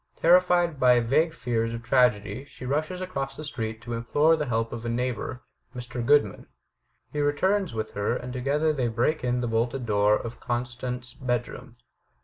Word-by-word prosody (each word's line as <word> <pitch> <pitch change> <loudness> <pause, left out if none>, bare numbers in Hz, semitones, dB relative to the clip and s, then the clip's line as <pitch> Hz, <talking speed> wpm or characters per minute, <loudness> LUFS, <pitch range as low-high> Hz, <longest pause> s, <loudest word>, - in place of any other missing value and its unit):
Terrified 175 -2 +4
by 125 -1 +5
vague 145 +8 +2
fears 115 -6 -2
of 115 - -8
tragedy, 120 -2 +2
she 130 - -11
rushes 155 +7 -2
across 140 -7 -4
the 155 - -7
street 110 -5 -5
to 120 - -5
implore 145 +8 +3
the 150 -2 -3
help 115 -1 -1
of 115 -1 -6
a 120 - -3
neighbor, 125 +1 -3 0.3
Mr. 125 0 -5
Grodman. 130 -6 +2 0.7
He 150 - -2
returns 180 - +1
with 110 0 -3
her, 100 +3 -1
and 125 0 -6
to 130 - -4
gether 150 +4 +1
they 130 -5 0
break 120 +7 0
in 125 0 0
the 120 - -1
bolted 120 +3 -1
door 105 -1 +3
of 115 +2 -6
Constant's 125 0 -4
bedroom. 120 -2 -4
125 Hz, 175 wpm, -26 LUFS, 115-145 Hz, 0.7 s, by